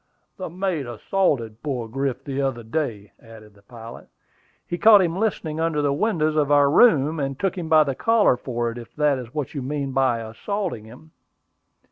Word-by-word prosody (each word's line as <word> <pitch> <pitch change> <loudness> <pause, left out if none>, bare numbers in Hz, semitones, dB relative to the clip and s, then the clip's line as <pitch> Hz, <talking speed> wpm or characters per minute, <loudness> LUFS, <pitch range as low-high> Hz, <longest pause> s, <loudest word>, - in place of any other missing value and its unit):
"The 185 - -5
mate 175 -5 -3
assaulted 120 - -1
poor 130 -6 -3
Griff 135 +2 -3
the 140 0 -3
other 130 -4 -2
day," 110 -5 -4
added 110 -2 -15
the 100 - -22
pilot. 115 +2 -12 0.6
"He 175 - -5
caught 210 -3 +7
him 170 -1 -1
listening 180 -7 -2
under 160 -2 0
the 140 -1 +1
windows 155 -3 0
of 145 -2 +1
our 145 -1 +5
room, 160 - +4
and 135 -1 -3
took 195 -1 -1
him 170 -4 -5
by 155 -1 +6
the 140 -2 -2
collar 225 - +3
for 120 -2 -3
it, 120 - -8
if 115 - -13
that 150 -3 +1
is 120 -2 -9
what 150 -1 -4
you 140 - -4
mean 140 +1 -3
by 130 -3 +1
assaulting 175 - -4
him." 125 +8 -15
140 Hz, 190 wpm, -23 LUFS, 120-165 Hz, 0.6 s, caught